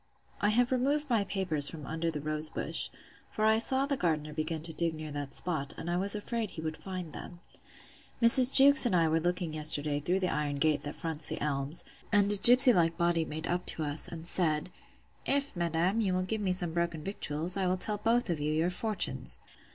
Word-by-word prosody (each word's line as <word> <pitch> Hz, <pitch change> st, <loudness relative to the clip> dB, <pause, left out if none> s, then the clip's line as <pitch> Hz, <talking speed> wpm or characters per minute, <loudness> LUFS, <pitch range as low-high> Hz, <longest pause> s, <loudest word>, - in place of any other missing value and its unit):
I 205 Hz, -, +1 dB
have 245 Hz, +4 st, 0 dB
removed 280 Hz, +3 st, -2 dB
my 225 Hz, -4 st, +1 dB
papers 180 Hz, -7 st, -1 dB
from 155 Hz, -3 st, -10 dB
under 165 Hz, +1 st, -4 dB
the 150 Hz, -3 st, -6 dB
rose 155 Hz, +1 st, -2 dB
bush; -, -, -4 dB, 0.4 s
for 215 Hz, -, -3 dB
I 220 Hz, 0 st, +2 dB
saw 265 Hz, +4 st, 0 dB
the 280 Hz, 0 st, -3 dB
gardener 155 Hz, -, -3 dB
begin 155 Hz, +1 st, -5 dB
to 165 Hz, 0 st, +1 dB
dig 165 Hz, 0 st, -2 dB
near 155 Hz, -1 st, -9 dB
that 145 Hz, -1 st, -7 dB
spot; 155 Hz, -6 st, -3 dB
and 175 Hz, -, -6 dB
I 175 Hz, -, -2 dB
was 200 Hz, +3 st, +2 dB
afraid 220 Hz, +1 st, -5 dB
he 160 Hz, -, -10 dB
would 155 Hz, 0 st, -6 dB
find 185 Hz, -5 st, -9 dB
them. 175 Hz, -, -11 dB, 0.8 s
Mrs. 250 Hz, +2 st, +11 dB
Jewkes 280 Hz, -1 st, +7 dB
and 190 Hz, -, -1 dB
I 165 Hz, -2 st, +1 dB
were 160 Hz, +1 st, 0 dB
looking 175 Hz, -1 st, -4 dB
yesterday 150 Hz, -1 st, +2 dB
through 180 Hz, +6 st, -3 dB
the 185 Hz, -, -2 dB
iron 145 Hz, -1 st, -4 dB
gate 150 Hz, +1 st, -1 dB
that 145 Hz, -, -8 dB
fronts 160 Hz, -3 st, -6 dB
the -, -, -5 dB
elms; 140 Hz, +1 st, -5 dB, 0.3 s
and 205 Hz, -1 st, +2 dB
a -, -, +1 dB
gipsy 250 Hz, +4 st, +8 dB
like 165 Hz, -3 st, 0 dB
body 170 Hz, -2 st, -1 dB
made 155 Hz, +1 st, -8 dB
up 180 Hz, +1 st, -4 dB
to 160 Hz, -, +1 dB
us, 145 Hz, +1 st, -5 dB
and 165 Hz, -1 st, -10 dB
said; 165 Hz, -2 st, -2 dB, 0.6 s
If, 280 Hz, -3 st, -2 dB
madam, 175 Hz, +5 st, -2 dB
you 190 Hz, -4 st, -2 dB
will 185 Hz, -, -2 dB
give 215 Hz, +3 st, -4 dB
me 190 Hz, -2 st, -2 dB
some 175 Hz, -3 st, +1 dB
broken 170 Hz, -2 st, -4 dB
victuals, 170 Hz, -2 st, -2 dB
I 190 Hz, -2 st, -2 dB
will 185 Hz, +1 st, -1 dB
tell 210 Hz, +3 st, -2 dB
you -, -, -23 dB
both 235 Hz, +1 st, 0 dB
your 160 Hz, +1 st, -2 dB
fortunes. 215 Hz, +2 st, -2 dB
175 Hz, 215 wpm, -28 LUFS, 155-205 Hz, 0.8 s, Mrs